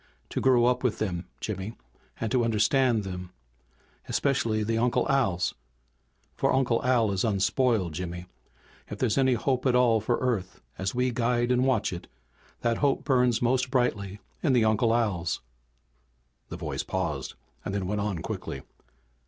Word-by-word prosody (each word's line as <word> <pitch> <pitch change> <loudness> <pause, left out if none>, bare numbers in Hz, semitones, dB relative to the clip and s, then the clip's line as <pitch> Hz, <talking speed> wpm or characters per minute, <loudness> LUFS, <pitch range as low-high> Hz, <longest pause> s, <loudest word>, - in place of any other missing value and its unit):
To - - -2
grow 125 -2 +4
up 125 +1 +2
with 115 -4 +1
them, 90 -5 -3
Jimmy 105 +1 -5 0.4
and 110 - -2
to 125 -2 +3
understand 115 +1 +2
them. 90 -2 -6 0.8
Especially 115 -6 +1
the 115 +1 0
Uncle 120 +1 +1
Als. 95 -11 +1 0.8
For - - +1
Uncle 125 -3 +1
Al 120 -4 +3
is 95 -1 0
unspoiled, 105 - +1
Jimmy. 90 +1 -5 0.6
If 105 - -6
there's 120 +2 +1
any 130 -1 +4
hope 130 +2 0
at 125 - +3
all 120 -3 +4
for 120 +3 +1
Earth 110 -8 -2 0.2
as 95 +4 -3
we 125 0 +1
guide 120 +1 +1
and 125 +1 +3
watch 120 -8 +1
it, 85 - -7 0.5
that 115 -1 +1
hope 140 -2 +1
burns 125 -4 +2
most 130 +1 +2
brightly 105 -6 0 0.2
in 145 -6 +2
the 120 -3 +4
Uncle 110 +1 +3
Als!" 105 -8 0 1.1
The - - -6
voice - - -3
paused, - - -3 0.3
then 100 -1 -2
went 105 +2 -1
on 100 -5 -2
quickly. - - -5
115 Hz, 155 wpm, -27 LUFS, 100-125 Hz, 1.1 s, grow